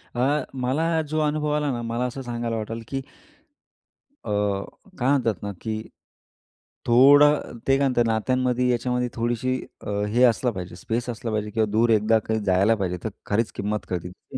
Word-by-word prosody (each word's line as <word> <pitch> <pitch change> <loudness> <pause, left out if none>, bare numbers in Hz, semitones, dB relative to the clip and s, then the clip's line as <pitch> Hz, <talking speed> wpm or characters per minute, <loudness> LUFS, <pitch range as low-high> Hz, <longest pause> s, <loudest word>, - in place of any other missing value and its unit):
अ, 140 +5 +1
मला 135 +6 0 0.2
जो 155 - +1
अनुभव 150 0 0
आला 150 -1 0
ना, 120 -2 -3
मला 115 +1 -2
असं 125 +2 -4
सांगायला 120 -2 -3
वाटलं 115 +1 -4
की 135 - -3 1.3
अ, - - -5 0.7
काय 125 0 +1
म्हणतात 120 -8 +1
ना, 100 - -3
की 110 -1 -3 1.1
थोडं 140 +3 +5
ते 135 0 +4
काय 140 0 +2
म्हणतात 120 -2 +2
नात्यांमध्ये, 125 +2 +1
याच्यामध्ये 125 0 0
थोडीशी 120 +2 -1 0.6
हे 125 +2 +4
असला 120 +1 +2
पाहिजे, 90 -4 -7
स्पेस 115 +6 -3
असला 115 -1 -4
पाहिजे. 105 -1 -2
किंवा 110 +1 +1
दूर 115 +3 +3
एकदा 110 +1 +4
काही 110 +1 -2
जायला 95 +4 +3
पाहिजे. 95 -4 -2
तर 110 - -2 0.2
खरीच 110 +2 0
किंमत 105 +1 -2
कळती, 90 -1 -3
ती. - - -10
120 Hz, 165 wpm, -24 LUFS, 110-130 Hz, 1.3 s, थोडं